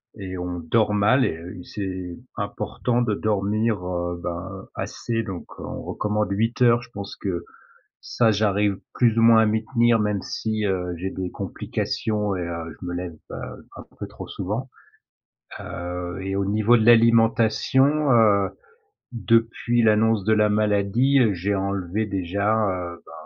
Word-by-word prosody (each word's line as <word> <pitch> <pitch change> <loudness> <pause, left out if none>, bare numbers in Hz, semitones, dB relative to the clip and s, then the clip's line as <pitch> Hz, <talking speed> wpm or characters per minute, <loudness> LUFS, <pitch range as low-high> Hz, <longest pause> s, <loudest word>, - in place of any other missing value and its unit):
et 95 -3 -6
on 90 0 -4
dort 105 +6 +1
mal. 115 +6 +4
Et 80 - -2
heu, 90 +2 -9
c'est 95 -3 -5 0.2
important 105 +4 -2
de 110 -3 +1
dormir, 105 0 0
heu, 85 -1 -3
ben, 95 +3 -6
assez, 115 -1 -3
donc 95 -5 -6
on - - -6
recommande 105 0 -2
8 115 +5 -1
heures, 120 -1 +5
je 120 - -14
pense 100 -2 -7
que 90 -4 -3 0.6
ça, 115 -2 +2
j'arrive 105 -1 +1 0.2
plus 115 -2 +2
ou - - +4
moins 115 0 +7
à - - +4
m'y 110 +1 0
tenir, 120 0 +3
même 105 -2 0
si, 110 +2 -2
heu, 90 -2 -1
j'ai 95 +3 -3
des 95 -1 -5
complications 105 -2 -2
et 90 - -3
heu, 85 -2 -5
je - - -6
me 90 - -4
lève, 90 -1 -5 0.2
heu, - - -8
un - - -8 0.2
peu - - -5
trop - - -9
souvent. 105 +8 -4 0.9
Heu 90 0 -5
et 95 0 -3
au 100 0 0
niveau 110 +4 +3
de 110 - +1
l'alimentation, 115 +5 +4
heu, 105 -5 +4 0.6
depuis 115 +2 +1
l'annonce 110 -1 +3
de 110 - +4
la 105 0 +3
maladie, 105 +6 +2
heu, 110 -4 +3
j'ai 100 +3 -1
enlevé 100 +1 -2
déjà, 100 +2 0
heu, 85 -2 -5
ben - - -14
105 Hz, 165 wpm, -23 LUFS, 95-115 Hz, 0.9 s, moins